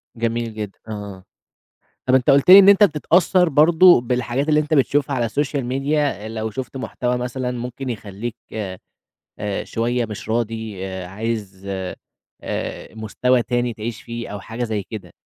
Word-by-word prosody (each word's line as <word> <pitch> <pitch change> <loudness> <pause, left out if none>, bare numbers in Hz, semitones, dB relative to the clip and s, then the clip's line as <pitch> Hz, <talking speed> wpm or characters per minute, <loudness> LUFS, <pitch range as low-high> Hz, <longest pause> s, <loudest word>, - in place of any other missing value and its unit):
جميل 115 0 -2
جدًا، 105 -2 -5 0.2
آه، - - -7
آه، 100 -3 -7 0.8
طَب 130 - +5
أنت 130 -2 +2
قُلت 140 +5 +4
لي 195 - +12
إن 195 - +8
أنت 200 +1 +7
بتتأثر 180 +1 +3
برضه 160 +2 +6
بالحاجات 125 +4 -1
اللي 150 0 +4
أنت 150 +1 -2
بتشوفها 140 0 +2
على 120 -2 +1
السوشيال 140 +3 -1
ميديا. 135 -4 -1
لو 110 0 -3
شُفت 130 +4 -6
محتوى، 125 -1 -2
مثلًا، 125 +1 -3
ممكن 125 +2 -5
يخليك، 110 0 -5 0.8
آآ، 105 -2 -5
شوية 120 +1 -1
مش 105 -1 -8
راضي، 110 -4 -2
آآ، 95 -1 -6
عايز، 100 -1 -5 0.8
آآ، - - -5
مستوى 120 +3 +1
تاني 120 -1 -1
تعيش 110 +1 -6
فيه 115 0 -6
أو 105 0 -6
حاجة 115 +3 -5
زي 110 -4 -2
كده، 105 +1 -9
120 Hz, 155 wpm, -21 LUFS, 110-135 Hz, 0.8 s, لي